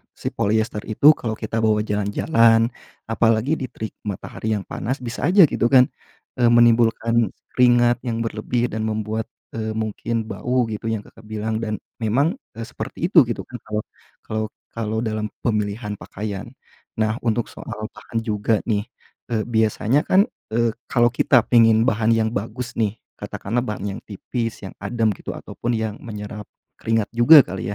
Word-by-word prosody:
si - - -3
poliester 110 0 0
itu 125 +8 +6
kalau 110 -2 -3
kita 110 +1 -3
bawa 110 -1 +2
jalan-jalan, 115 +3 +3 0.4
apalagi 115 +6 +2
di 130 - -3
terik 110 -3 -6 0.2
matahari 105 +2 -3
yang 100 - -3
panas, 130 +5 -3
bisa 120 +1 -2
aja, 190 +2 +7
gitu, 120 - +2
kan, 125 0 +6 0.5
eee, 120 - +5
menimbulkan 115 -1 +4 0.2
keringat 120 -1 +4
yang 115 -1 -1
berlebih 120 +2 -1
dan 110 +1 -2
membuat, 110 0 -2 0.2
eee, 110 -1 -4
mungkin 110 +1 -2
bau, 125 +2 0
gitu, 105 +1 -4
yang 110 -2 -2
Kakak 110 +1 -17
bilang, 110 +1 -2
dan 110 -2 -2 0.3
memang, 140 - +1 0.2
e 115 - -5
seperti 140 +8 -4
itu, 165 -7 +8
gitu, 120 - -3
kan, 125 - -9
kalau 105 0 -2 0.4
kalau 110 0 -2 0.2
kalau 110 -1 -3
dalam 110 -2 -2
pemilihan 105 -1 -2
pakaian. 100 -1 -6 0.6
Nah, 110 +1 +1
untuk 115 0 0
soal 110 0 -7
bahan 115 - -5
juga, 105 -1 0
nih, 105 -1 +1 0.5
eee, 110 - +1
biasanya, 110 +4 +1
kan, 190 +2 +5 0.3
eee, 115 0 +2
kalau 120 -1 +3
kita 125 +1 +4
pengen 115 -2 +5
bahan 115 -1 +1
yang 110 -1 +2
bagus, 115 +3 -4
nih, 110 -2 +1 0.2
katakanlah 120 +5 -3
bahan 105 -3 -4
yang - - -11
tipis, 115 +3 -4
yang 95 - -9
adem, 110 +2 +1
gitu, - - -6
ataupun 120 - -5
yang 110 -2 -2
menyerap 105 -1 -7 0.3
keringat 115 -2 0
juga 130 +6 +8
kali, 95 +2 -5
110 Hz, 160 wpm, -22 LUFS, 110-120 Hz, 0.6 s, itu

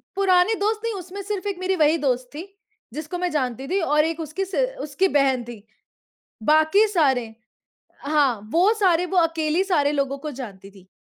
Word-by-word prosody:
पुराने 380 +1 +3
दोस्त 430 +1 -1
नहीं, 460 -1 -2
उसमें 375 +1 -7
सिर्फ 410 0 -4
एक 395 -3 -3
मेरी 375 +1 0
वही 310 -1 +3
दोस्त 255 -4 -1
थी, 340 +5 -7 0.5
जिसको 310 +4 -5
मैं 360 0 -1
जानती 265 -2 -2
थी 385 +4 0
और 300 0 +4
एक 325 0 -3
उसकी 380 +6 -4
स 380 - -8 0.3
उसकी 300 +6 0
बहन 265 -3 +2
थी। 230 -4 -11 0.8
बाकी 315 - +4
सारे 265 - +1 0.7
हाँ, 280 -7 +1
वो 365 +6 +4
सारे 360 -4 +2
वो 375 - -3
अकेली 330 +1 +1
सारे 300 -7 +1
लोगों 275 -1 -1
को 300 +2 -6
जानती 195 -4 -9
थी। 190 -2 -19
315 Hz, 180 wpm, -23 LUFS, 275-375 Hz, 0.8 s, और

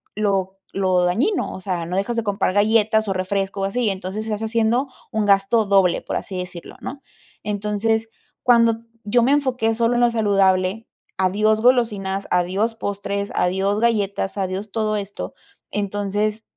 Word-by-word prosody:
lo 195 -2 0 0.2
lo 185 -2 +2
dañino, 245 - +1
o 190 - -8
sea, 180 -3 -2
no 175 +2 -4
dejas 200 +5 -1
de 230 - 0
comprar 205 -3 0
galletas 220 +1 +3
o 195 - 0
refresco 195 +1 -2
o - - +1
así, 200 +6 -1
y 220 - +3
entonces, 195 +3 -5
estás 215 -1 -3
haciendo 230 +4 +1 0.2
un 220 -3 0
gasto 200 +3 +3
doble, 195 -3 +3
por - - -4
así 185 -2 -4
decirlo, 180 -1 -8
¿no? 275 0 -7 0.4
Entonces, 210 +2 -1 0.3
cuando 230 -2 +5 0.3
yo 240 +4 +3
me 245 +4 +3
enfoqué 255 -6 +1
solo 235 +1 +2
en 240 - +2
lo 240 - +5
saludable, 195 -1 +2 0.3
adiós 210 +4 +2
golosinas, 210 -6 +1
adiós 190 +6 +1
postres, 200 -1 -3
adiós 195 +3 +1
galletas, 205 -4 0
adiós 195 +2 -3
todo 215 -1 0
esto, 200 0 -6 0.4
entonces, 205 +1 -1
205 Hz, 160 wpm, -22 LUFS, 195-225 Hz, 0.4 s, cuando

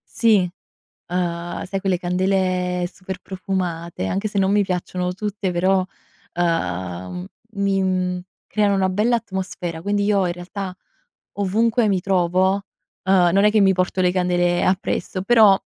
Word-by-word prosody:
Sì, 225 -4 +5 0.7
uhm, 175 -1 -2
sai 195 +1 -3
quelle 185 -2 0
candele 180 -1 0
super 190 -1 -7
profumate, 180 - -3
anche 195 - -1
se 205 -1 -2
non 195 +1 +3
mi 205 0 +4
piacciono 180 0 -2
tutte 200 -1 -3
però, 185 +2 +2 0.5
uhm, 90 - -2 0.3
mi, 195 -1 +1
mhmm, 185 -1 0 0.3
creano 205 -2 +1
una 190 -1 +2
bella 215 +6 +2
atmosfera 185 -5 -5
quindi 205 +2 0
io 200 -2 +2
in 175 - -1
realtà 180 +2 -6 0.7
ovunque 220 +3 +2
mi 190 -2 +1
trovo, 185 0 +2 0.5
uhm, 185 -2 +4
non 195 +2 +4
è 210 - +6
che 215 0 +3
mi 190 -1 +5
porto 185 +1 0
le 180 -1 +3
candele 175 -1 +1
appresso 185 0 -1
però, 210 -2 +6
185 Hz, 145 wpm, -21 LUFS, 175-195 Hz, 0.7 s, è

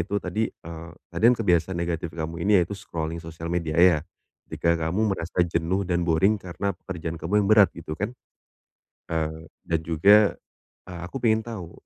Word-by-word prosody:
itu 100 - -2
tadi, 105 +5 -1
eee, 85 0 -10 0.2
tadi - - -5
kan - - +4
kebiasaan 90 -3 +2
negatif 85 -1 -3
kamu 80 +1 -5
ini 100 -2 +5
yaitu 85 +4 -2
scrolling 80 -2 -5
sosial 80 0 -7
media 80 -3 -1
ya. 90 -4 +6 0.4
Ketika 85 0 0
kamu 105 +6 +1
merasa 85 +2 -2
jenuh 85 +3 0
dan 85 -1 +1
boring 90 +6 +3
karena 95 +1 -3
pekerjaan 85 -3 -6
kamu 90 +6 +1
yang 100 - -1
berat, 105 -2 +6
gitu 80 -2 -7
kan? 105 +5 -3 1.0
Eee, 80 0 -3 0.2
dan 80 -1 0
juga, 100 +6 +4 0.5
eee, 90 -2 -8
aku - - -9
pengen 110 -2 +2
tahu, 100 -8 -7
85 Hz, 170 wpm, -25 LUFS, 80-100 Hz, 1.0 s, ya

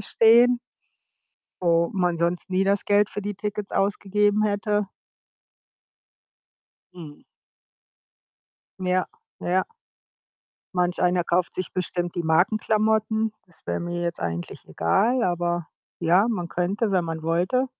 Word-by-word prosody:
stehen 235 +4 +5 1.0
wo 170 -1 +3
man 180 -3 +1
sonst 170 +3 -1
nie 190 +1 +2
das 200 0 +1
Geld 205 0 +3
für 205 - -6
die 205 0 -4
Tickets 205 0 -5
ausgegeben 205 +1 +1
hätte. 205 0 0 2.1
Mhm. 155 -5 -11 1.6
Ja. 185 0 0 0.3
Ja. 185 +2 +1 1.1
Manch 180 0 0
einer 180 0 +3
kauft 175 +1 0
sich 185 - -4
bestimmt 175 -1 -2
die 175 - -2
Markenklamotten. 215 +5 +1
Das 175 - -23
wäre - - -1
mir 175 0 -4
jetzt 170 0 -3
eigentlich 85 0 -5
egal, 225 - +1
aber 175 -2 -1 0.3
ja, 175 +5 +3
man 175 -7 -3
könnte, 195 +6 -1
wenn 185 -3 +1
man 165 -1 -5
wollte. 180 +11 +1
185 Hz, 120 wpm, -24 LUFS, 175-210 Hz, 2.1 s, stehen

